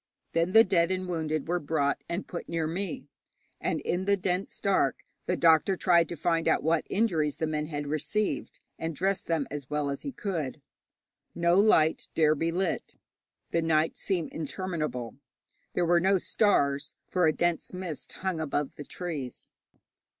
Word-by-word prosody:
Then 170 +3 +1
the 225 - +9
dead 180 -5 +2
and 185 0 -1
wounded 155 -4 -2
were 175 +1 +1
brought 145 -2 0
and 170 +3 -2
put 175 - -6
near 165 -1 -1
me, 165 -4 -4 0.5
and - - -1
in 180 +2 -1
the 200 0 +3
dense 185 0 -2
dark 190 -9 +1 0.2
the 180 - +1
doctor 165 +3 +4
tried 170 -2 +4
to 170 - -4
find 165 +1 0
out - - +3
what 160 +1 +1
injuries 165 -9 +1
the 160 - 0
men 155 -1 -2
had 145 -2 -4
received, 155 +8 -2 0.2
and 165 -1 -3
dress 195 +4 +1
them 160 -4 -1
as 145 -3 -6
well 150 -1 -1
as 140 - -5
he 280 - -4
could. 165 - -3 0.8
No 170 +2 +3
light 160 -7 +4
dare 155 -1 +5
be 165 +2 -1
lit. 180 0 -2 0.6
The 170 - +2
night 160 0 +2
seemed 180 -5 -1
interminable. 155 - -4 0.6
There 175 - +1
were 170 +1 +4
no 190 +2 +3
stars, 145 -9 +1
for 180 -3 +2
a - - +5
dense 175 +1 -1
mist 180 -5 -6
hung 185 -4 -2
above 145 -2 -1
the 145 - -6
trees. 150 -9 -5
165 Hz, 170 wpm, -28 LUFS, 155-185 Hz, 0.8 s, the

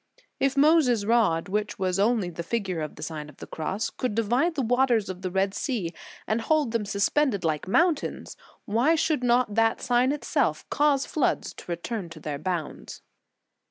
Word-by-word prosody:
j - - -27 0.2
If 275 +1 -5
Moses 275 -8 +4
rod, 210 -8 +2
which 210 +2 -2
was 185 -1 -1
only 210 -3 +2
the 170 - -6
figure 185 -2 -2
of 155 - -5
the - - -8
Sign 155 -2 -6
of 145 - -16
the - - -9
Cross, 190 +7 -3
could 250 -5 -3
divide 245 +10 +1
the 275 - 0
waters 240 -4 +2
o - - -4
of 180 - -16
the 185 - -2
Red 190 +1 0
Sea 200 - -2 0.3
and 220 +2 0
hold 300 0 +1
them 225 -2 -1
suspended 200 +3 +1
like 155 +1 -1
mountains, 330 - 0 0.3
why 240 +10 +2
should 310 -4 0
not 245 -3 +2
that 225 +1 +2
sign 245 +2 +2
itself 295 - -1
cause 290 -2 +2
floods 305 - -1
to - - -9
return 175 +2 -4
to 165 -1 -11
their 145 -2 -5
bounds? 175 -4 -5
220 Hz, 190 wpm, -26 LUFS, 185-255 Hz, 0.3 s, Moses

